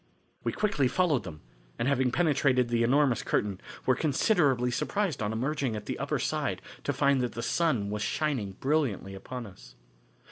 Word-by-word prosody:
We -, -, 0 dB
quickly 200 Hz, -11 st, +1 dB
followed 150 Hz, -, +1 dB
them, 75 Hz, -4 st, -8 dB, 0.4 s
and 120 Hz, -, 0 dB
having 130 Hz, -2 st, +2 dB
penetrated 135 Hz, -5 st, +2 dB
the 120 Hz, -1 st, +1 dB
enormous 130 Hz, +1 st, +3 dB
curtain, 100 Hz, -3 st, -1 dB, 0.2 s
were 130 Hz, -, +4 dB
considerably 140 Hz, -, +2 dB
surprised 190 Hz, -, -1 dB
on 105 Hz, 0 st, -1 dB
emerging 130 Hz, +1 st, -1 dB
at 105 Hz, -1 st, -6 dB
the -, -, -4 dB
upper -, -, -1 dB
side -, -, -1 dB, 0.3 s
to -, -, +1 dB
find 140 Hz, -2 st, +2 dB
that 125 Hz, -1 st, -2 dB
the 115 Hz, +1 st, -4 dB
sun 125 Hz, -12 st, +1 dB
was 105 Hz, 0 st, -3 dB
shining 125 Hz, -8 st, -1 dB
brilliantly 130 Hz, -6 st, -1 dB
upon 120 Hz, +5 st, -7 dB
us. -, -, -14 dB
125 Hz, 170 wpm, -29 LUFS, 110-145 Hz, 0.4 s, were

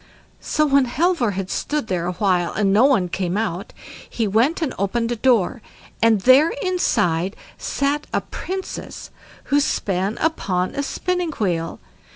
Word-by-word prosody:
So 305 Hz, -, +1 dB
when 280 Hz, -2 st, +4 dB
Halvor 255 Hz, -, +1 dB
had 190 Hz, -1 st, -4 dB
stood 300 Hz, -3 st, -2 dB
there 175 Hz, -4 st, -2 dB
a 180 Hz, -, -2 dB
while 180 Hz, -3 st, +1 dB
and 200 Hz, -2 st, +1 dB
no 220 Hz, +6 st, +5 dB
one 245 Hz, -10 st, +3 dB
came 180 Hz, +1 st, -2 dB
out, 200 Hz, -4 st, -3 dB, 0.4 s
he 225 Hz, -2 st, -1 dB
went 230 Hz, -, +2 dB
and 295 Hz, -, -2 dB
opened 230 Hz, +4 st, 0 dB
a -, -, 0 dB
door, 230 Hz, -2 st, +2 dB, 0.4 s
and 225 Hz, -3 st, +4 dB
there 265 Hz, -, +6 dB
inside 205 Hz, -, +1 dB, 0.2 s
sat 285 Hz, +2 st, -1 dB
a -, -, 0 dB
Princess 380 Hz, 0 st, -6 dB, 0.4 s
who 290 Hz, -, +6 dB
span 195 Hz, -6 st, -1 dB
upon 185 Hz, -, 0 dB
a 280 Hz, -, -2 dB
spinning 355 Hz, +3 st, -2 dB
wheel. 170 Hz, -8 st, -2 dB
225 Hz, 155 wpm, -21 LUFS, 190-285 Hz, 0.4 s, there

